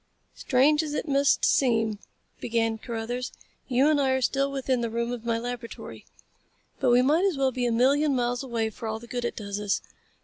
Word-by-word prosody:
"Strange 290 +4 +3
as 300 -2 -4
it - - -3
must 280 0 +3
seem," 225 -5 +2 0.4
began 225 -1 -1
Carruthers, 240 +2 -4 0.4
"you 260 +2 +3
and 300 -2 +3
I 270 - +2
are 260 - 0
still 275 +2 +1
within 265 -2 -1
the 235 - -1
room 235 +1 -2
of 240 -2 -6
my 230 -1 +1
laboratory. 240 0 -7 0.7
But - - +2
we 245 +1 +5
might 305 +7 +3
as 375 -7 +1
well 270 -1 +2
be 250 -1 -1
a - - 0
million 275 +5 +3
miles 245 -1 0
away 230 -4 -2
for 225 - -7
all 220 0 -2
the 230 - -11
good 245 0 -4
it - - -3
does 200 -1 -5
us. 205 -1 0
245 Hz, 205 wpm, -26 LUFS, 230-275 Hz, 0.7 s, we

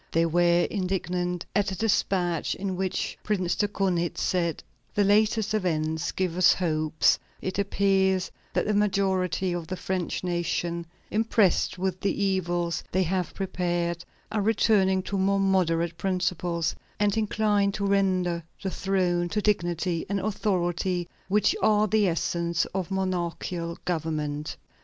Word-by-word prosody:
They 165 0 +3
were 175 +1 +3
indignant 180 -2 -2
at 200 -1 +2
a 190 - -4
despatch 185 -5 +1
in 190 -1 -3
which 190 0 -2
Prince 185 -4 0
de 205 - +1
Kaunitz 180 -4 -1
said: 170 -4 0 0.3
"The 205 - +4
latest 215 +1 +3
events 160 -5 0
give 180 -2 -2
us 185 -1 +6
hopes; 155 -3 +2 0.2
it 185 +1 -3
appears 190 -2 +2 0.2
that - - +1
the 210 - +1
majority 190 -3 +1
of 170 -2 -4
the 185 - -4
French 185 -1 -2
nation, 170 -1 -2 0.2
impressed 215 -5 +2
with 185 0 -2
the 200 - 0
evils 175 -3 0
they 190 +1 +2
have 180 -1 -2
prepared, 175 -2 -1 0.3
are 210 0 0
returning 195 -3 +3
to 200 0 -2
more 195 +1 +2
moderate 170 -4 +1
principles, 180 -2 -1 0.2
and 205 -1 +2
incline 210 -2 +1
to 200 - -2
render 185 -4 +1 0.2
to 190 - -2
the - - -8
throne 180 -3 +1
the 210 - 0
dignity 175 -4 0
and 200 0 0
authority 185 -3 -1 0.2
which 205 +1 +3
are 215 0 +4
the 210 0 +3
essence 170 0 0
of 190 -2 -2
monarchical 175 -2 -2
government." 155 -3 -2
185 Hz, 140 wpm, -26 LUFS, 170-195 Hz, 0.3 s, us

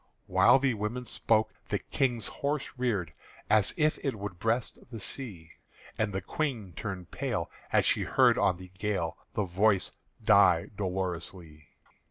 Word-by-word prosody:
While 120 +2 +6
the 135 -2 +1
woman 110 +4 -3
spoke, 110 -2 +1 0.2
the - - +1
King's 120 -5 -1
horse 145 0 -2
reared 105 - -1 0.4
As 105 -3 +5
if 155 -1 +2
it 135 -4 -1
would 100 -4 -6
breast 115 +3 -1
the 115 -3 -7
sea, 100 -8 -6 0.4
And 110 -1 0
the 95 -1 -3
Queen 115 - -3
turned 90 +1 -6
pale 125 - -2 0.2
as - - +4
she - - +3
heard - - +4
on 100 -3 +2
the 90 0 -12
gale 100 -6 -1 0.2
The 105 - +1
voice 95 +2 +2 0.3
die - - +5
dolorously. 90 -5 -4
105 Hz, 150 wpm, -29 LUFS, 90-120 Hz, 0.4 s, While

